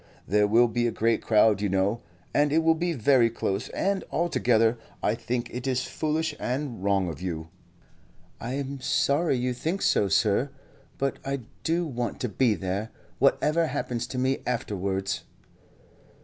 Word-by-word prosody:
There 105 Hz, +2 st, +3 dB
will 115 Hz, +3 st, +5 dB
be 120 Hz, +1 st, 0 dB
a -, -, 0 dB
great 115 Hz, 0 st, +1 dB
crowd, 105 Hz, -2 st, +4 dB
you 105 Hz, -, 0 dB
know, 95 Hz, +4 st, +1 dB, 0.3 s
and 145 Hz, 0 st, +3 dB
it 160 Hz, +2 st, +3 dB
will 165 Hz, 0 st, +5 dB
be 170 Hz, +2 st, -1 dB
very 125 Hz, -2 st, +4 dB
close, 100 Hz, -3 st, -2 dB
and 195 Hz, 0 st, -1 dB
altogether 120 Hz, -9 st, +2 dB, 0.2 s
I -, -, +2 dB
think 120 Hz, +1 st, -3 dB
it 125 Hz, +2 st, -4 dB
is 130 Hz, -1 st, +1 dB
foolish 160 Hz, +1 st, -1 dB
and 125 Hz, -5 st, -3 dB
wrong 100 Hz, -2 st, +2 dB
of 80 Hz, -3 st, -6 dB
you." 80 Hz, -3 st, -4 dB, 0.9 s
"I 120 Hz, +3 st, -4 dB
am 140 Hz, 0 st, -4 dB
sorry 140 Hz, +2 st, +2 dB
you 125 Hz, +1 st, -1 dB
think 165 Hz, +10 st, -2 dB
so, 100 Hz, -, +3 dB
sir; 105 Hz, -, +2 dB, 0.5 s
but 135 Hz, 0 st, -1 dB
I 135 Hz, -1 st, -2 dB, 0.2 s
do 170 Hz, +2 st, +1 dB
want 120 Hz, -5 st, -3 dB
to 125 Hz, -, -1 dB
be 115 Hz, 0 st, +2 dB
there, 100 Hz, +4 st, -3 dB, 0.3 s
whatever 155 Hz, +4 st, +3 dB
happens 120 Hz, -5 st, -3 dB
to 130 Hz, -, -6 dB
me 130 Hz, +1 st, +1 dB
afterwards." 95 Hz, -5 st, -2 dB
120 Hz, 165 wpm, -27 LUFS, 105-140 Hz, 0.9 s, will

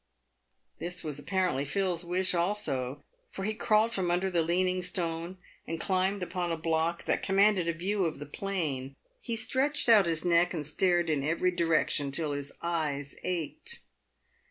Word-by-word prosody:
This 175 Hz, +2 st, -2 dB
was 150 Hz, -3 st, -2 dB
apparently 180 Hz, -4 st, 0 dB
Phil's 180 Hz, +3 st, 0 dB
wish 185 Hz, +2 st, +1 dB
also, 145 Hz, -8 st, 0 dB, 0.3 s
for 195 Hz, -, -6 dB
he 215 Hz, +2 st, 0 dB
crawled 215 Hz, 0 st, +2 dB
from 185 Hz, -4 st, 0 dB
under 180 Hz, +2 st, +1 dB
the 170 Hz, -2 st, +2 dB
leaning 180 Hz, +2 st, +2 dB
stone, 175 Hz, 0 st, -2 dB, 0.3 s
and 165 Hz, 0 st, -3 dB
climbed 190 Hz, +2 st, +1 dB
upon 180 Hz, -1 st, -2 dB
a 165 Hz, -, -1 dB
block 165 Hz, +1 st, 0 dB
that -, -, 0 dB
commanded 195 Hz, -2 st, +3 dB
a 170 Hz, -, +1 dB
view 190 Hz, +3 st, 0 dB
of 160 Hz, -, -2 dB
the 145 Hz, -, -7 dB
plain. 145 Hz, -6 st, -3 dB, 0.3 s
He 235 Hz, -, -2 dB
stretched 275 Hz, +5 st, +1 dB
out 215 Hz, -6 st, +6 dB
his 165 Hz, 0 st, -1 dB
neck 175 Hz, +1 st, +3 dB
and 150 Hz, -3 st, -3 dB
stared 175 Hz, +2 st, +2 dB
in 140 Hz, -3 st, 0 dB
every 170 Hz, +4 st, +1 dB
direction 165 Hz, -4 st, +1 dB
till 150 Hz, +2 st, -2 dB
his 145 Hz, 0 st, -3 dB
eyes 150 Hz, -5 st, -2 dB
ached. 185 Hz, -, -2 dB
175 Hz, 165 wpm, -29 LUFS, 160-190 Hz, 0.3 s, out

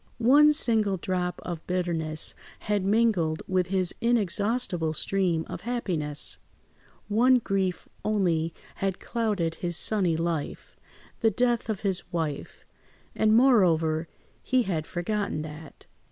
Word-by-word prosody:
One 285 Hz, +6 st, +6 dB
single 220 Hz, -9 st, +2 dB
drop 180 Hz, 0 st, -2 dB
of 170 Hz, -3 st, -6 dB
bitterness 165 Hz, -4 st, -2 dB, 0.3 s
had 205 Hz, -2 st, -1 dB
mingled 195 Hz, -6 st, +1 dB
with 185 Hz, -2 st, +1 dB
his 185 Hz, -2 st, +1 dB
inexhaustible 205 Hz, -6 st, +1 dB
stream 180 Hz, -4 st, +1 dB
of -, -, -7 dB
happiness; 175 Hz, -12 st, -1 dB, 0.7 s
one 245 Hz, +5 st, +4 dB
grief 195 Hz, -6 st, -2 dB, 0.2 s
only 175 Hz, -6 st, +1 dB, 0.3 s
had 195 Hz, -1 st, -2 dB
clouded 210 Hz, -8 st, -1 dB
his 175 Hz, -2 st, -2 dB
sunny 185 Hz, -7 st, +2 dB
life—the 165 Hz, +7 st, -4 dB
death 240 Hz, +2 st, 0 dB
of 210 Hz, -3 st, -2 dB
his 195 Hz, -3 st, -1 dB
wife—and 170 Hz, +6 st, -2 dB
moreover 165 Hz, -11 st, +3 dB, 0.3 s
he 255 Hz, -1 st, +1 dB
had 165 Hz, -7 st, -3 dB
forgotten 175 Hz, -3 st, -2 dB
that. 155 Hz, 0 st, -11 dB
185 Hz, 110 wpm, -27 LUFS, 165-220 Hz, 0.7 s, One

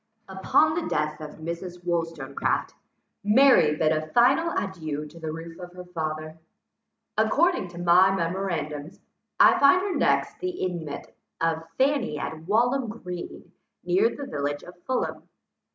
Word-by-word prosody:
Upon 190 Hz, +11 st, +2 dB
the 335 Hz, 0 st, -2 dB
death 150 Hz, 0 st, -1 dB
of 150 Hz, -1 st, -8 dB
Mrs. 170 Hz, +2 st, -7 dB
Wollstonecraft, 165 Hz, -5 st, -1 dB, 0.5 s
Mary 210 Hz, -, +5 dB
bid 155 Hz, 0 st, +2 dB
a 155 Hz, 0 st, -1 dB
final 270 Hz, -, +3 dB
adieu 155 Hz, -6 st, -3 dB
to 155 Hz, +3 st, -13 dB
the 160 Hz, -1 st, -4 dB
roof 165 Hz, +2 st, -8 dB
of 180 Hz, 0 st, -9 dB
her 180 Hz, 0 st, -9 dB
father. 155 Hz, -2 st, -5 dB, 0.8 s
According 350 Hz, -, +2 dB
to 175 Hz, 0 st, -12 dB
my 175 Hz, +2 st, +5 dB
memorandums, 170 Hz, -5 st, -3 dB, 0.4 s
I -, -, +7 dB
find 280 Hz, +6 st, +6 dB
her 380 Hz, 0 st, -2 dB
next -, -, +1 dB
the 365 Hz, -, -2 dB
inmate 175 Hz, -, -4 dB, 0.3 s
of 165 Hz, 0 st, 0 dB
Fanny 265 Hz, -, +1 dB
at 160 Hz, +2 st, -6 dB
Walham 240 Hz, +4 st, +2 dB
Green, 180 Hz, -6 st, -8 dB, 0.3 s
near 405 Hz, +5 st, +3 dB
the 285 Hz, -, -7 dB
village 145 Hz, -, -3 dB
of 180 Hz, -, -12 dB
Fulham. 260 Hz, -1 st, -2 dB
175 Hz, 140 wpm, -26 LUFS, 155-235 Hz, 0.8 s, I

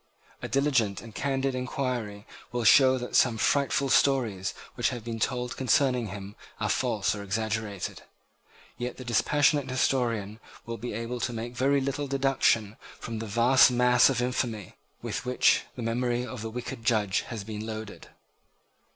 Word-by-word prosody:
A -, -, -4 dB
diligent 130 Hz, -8 st, +1 dB
and 110 Hz, +1 st, -11 dB
candid 135 Hz, -1 st, -1 dB
enquiry 125 Hz, -5 st, -3 dB, 0.3 s
will 120 Hz, -1 st, -2 dB
show 130 Hz, +1 st, +6 dB
that 125 Hz, -1 st, -5 dB
some 120 Hz, -3 st, +4 dB
frightful 140 Hz, +3 st, +1 dB
stories 125 Hz, -8 st, +2 dB, 0.2 s
which -, -, 0 dB
have 120 Hz, -3 st, -6 dB
been 115 Hz, -1 st, -5 dB
told 125 Hz, +1 st, -2 dB
concerning 125 Hz, -2 st, +2 dB
him 100 Hz, +1 st, -8 dB, 0.2 s
are -, -, -1 dB
false -, -, 0 dB
or 105 Hz, -, -6 dB
exaggerated. 105 Hz, -1 st, -3 dB, 0.8 s
Yet 125 Hz, 0 st, -4 dB
the 130 Hz, -, -9 dB
dispassionate 145 Hz, +4 st, +2 dB
historian 115 Hz, -5 st, 0 dB, 0.3 s
will 115 Hz, 0 st, -5 dB
be 120 Hz, +1 st, -5 dB
able 115 Hz, +2 st, -4 dB
to 120 Hz, -, -2 dB
make 115 Hz, +2 st, -5 dB
very 140 Hz, +2 st, +2 dB
little 140 Hz, +2 st, -2 dB
deduction 135 Hz, -6 st, +1 dB, 0.2 s
from 115 Hz, -1 st, -5 dB
the 110 Hz, -, -5 dB
vast 120 Hz, +6 st, +5 dB
mass 125 Hz, +1 st, +4 dB
of 125 Hz, -2 st, 0 dB
infamy 120 Hz, -5 st, -2 dB, 0.3 s
with -, -, -3 dB
which 125 Hz, 0 st, +3 dB
the 125 Hz, -, -5 dB
memory 120 Hz, +1 st, -1 dB
of 125 Hz, -3 st, -7 dB
the 110 Hz, -, -4 dB
wicked 115 Hz, 0 st, -6 dB
judge 105 Hz, -4 st, +1 dB
has 115 Hz, -5 st, -5 dB
been 105 Hz, 0 st, -6 dB
loaded. 110 Hz, -1 st, -7 dB
120 Hz, 160 wpm, -27 LUFS, 110-130 Hz, 0.8 s, show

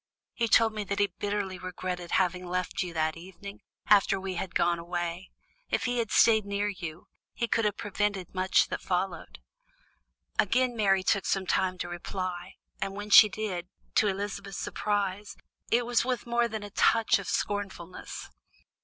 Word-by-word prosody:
He 230 Hz, -, 0 dB
told 225 Hz, +1 st, +5 dB
me 215 Hz, -1 st, -3 dB
that 200 Hz, +1 st, -2 dB
he 205 Hz, -1 st, +2 dB
bitterly 200 Hz, -2 st, -2 dB
regretted 180 Hz, -1 st, -5 dB
having 180 Hz, -1 st, +1 dB
left 180 Hz, +1 st, -2 dB
you 180 Hz, -, -3 dB
that 160 Hz, -1 st, 0 dB
evening, 190 Hz, +4 st, -10 dB, 0.2 s
after 200 Hz, -1 st, +4 dB
we 190 Hz, 0 st, -4 dB
had 180 Hz, 0 st, -5 dB
gone 170 Hz, 0 st, +2 dB
away. 175 Hz, +1 st, -4 dB, 0.4 s
If -, -, 0 dB
he 245 Hz, -1 st, 0 dB
had 225 Hz, -2 st, -1 dB
stayed 220 Hz, -1 st, +5 dB
near 200 Hz, +1 st, -1 dB
you, 170 Hz, -5 st, -7 dB, 0.3 s
he 235 Hz, -, -1 dB
could 225 Hz, -1 st, +1 dB
have 210 Hz, -1 st, 0 dB
prevented 205 Hz, -2 st, -2 dB
much 185 Hz, 0 st, +3 dB
that -, -, -3 dB
followed." 180 Hz, -, -2 dB, 1.0 s
Again 245 Hz, +4 st, +2 dB
Mary 195 Hz, -4 st, +3 dB
took 195 Hz, 0 st, +1 dB
some 195 Hz, -1 st, 0 dB
time 185 Hz, 0 st, +1 dB
to 175 Hz, -, -4 dB
reply, 175 Hz, +1 st, -5 dB, 0.3 s
and 195 Hz, 0 st, -2 dB
when 205 Hz, +1 st, -6 dB
she 215 Hz, +1 st, +10 dB
did, 190 Hz, -4 st, -4 dB, 0.3 s
to 220 Hz, -4 st, +4 dB
Elizabeth's 200 Hz, 0 st, -3 dB
surprise, 205 Hz, -1 st, -2 dB, 0.3 s
it 240 Hz, +1 st, +3 dB
was 240 Hz, -1 st, +2 dB
with 250 Hz, 0 st, -2 dB
more 235 Hz, 0 st, +2 dB
than 220 Hz, -2 st, -5 dB
a 205 Hz, -, -8 dB
touch 225 Hz, +1 st, +3 dB
of 195 Hz, -, -7 dB
scornfulness. 195 Hz, -4 st, -4 dB
195 Hz, 170 wpm, -29 LUFS, 180-210 Hz, 1.0 s, she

